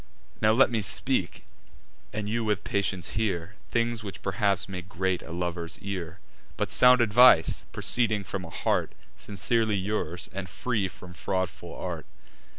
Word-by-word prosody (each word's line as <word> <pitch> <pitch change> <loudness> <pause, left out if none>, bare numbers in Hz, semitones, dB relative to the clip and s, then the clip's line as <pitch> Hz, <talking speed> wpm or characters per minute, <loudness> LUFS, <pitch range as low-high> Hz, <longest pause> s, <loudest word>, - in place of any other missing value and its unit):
Now 110 - +5
let 125 +3 +5
me 115 -2 +1
speak, 90 - -1 0.7
and 105 -1 -3
you 115 +2 0
with 105 -3 0
patience 95 -4 -1
hear, 95 -4 -1 0.2
Things 115 -1 0
which 100 -2 -8
perhaps 100 0 0
may 95 -2 -5
grate 95 0 -2
a - - -10
lover's 85 -1 -3
ear, 95 -3 -5 0.4
But - - -1
sound 125 0 +6
advice, 120 -5 +6
proceeding 110 -4 +1
from 95 -1 -4
a 85 - -8
heart - - 0 0.2
Sincerely 110 +2 0
yours, 95 -4 -2
and 95 -1 -5
free 110 -1 -1
from 90 0 -12
fraudful 95 +2 -3
art. - - -5
100 Hz, 150 wpm, -27 LUFS, 90-110 Hz, 0.7 s, sound